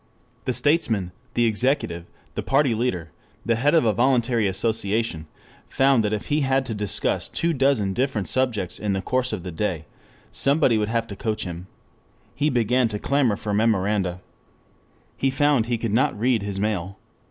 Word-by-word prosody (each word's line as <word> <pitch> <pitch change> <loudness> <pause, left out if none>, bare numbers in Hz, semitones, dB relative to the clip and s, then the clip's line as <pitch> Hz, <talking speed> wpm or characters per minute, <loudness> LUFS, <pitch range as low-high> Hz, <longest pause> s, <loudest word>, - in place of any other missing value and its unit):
The 130 - 0
statesman, 115 - +1 0.2
the 120 - +3
executive, 110 - 0 0.3
the - - -3
party 135 -2 +2
leader, 100 - -2 0.3
the 115 - +2
head 140 +8 +2
of 160 - +4
a 110 - +3
voluntary 120 -3 +2
association, 100 -3 -1 0.4
found 135 -3 +3
that 105 - 0
if 105 -1 -3
he 150 +1 +2
had 135 -1 +1
to 115 - -4
discuss 105 -2 -1
two 170 0 0
dozen 135 -8 +1
different 125 -4 -1
subjects 115 -9 -1
in 105 -2 -1
the 95 0 -2
course 130 +2 0
of 105 -5 -4
the 90 - -5
day, 85 -2 -2 0.5
somebody 140 -5 +2
would 105 0 -1
have 115 0 0
to 100 - -6
coach 110 +1 -2
him. 90 0 -7 0.7
He 145 +3 +1
began 125 -1 +2
to 105 -2 -4
clamor 135 -2 +1
for 105 0 -4
memoranda. 100 -4 +1 1.0
He 135 - +1
found 135 -3 +2
he 120 -1 0
could 115 -2 -3
not 130 -2 +1
read 120 -1 +2
his 100 -1 -4
mail. 100 -3 -2
115 Hz, 175 wpm, -23 LUFS, 100-130 Hz, 1.0 s, of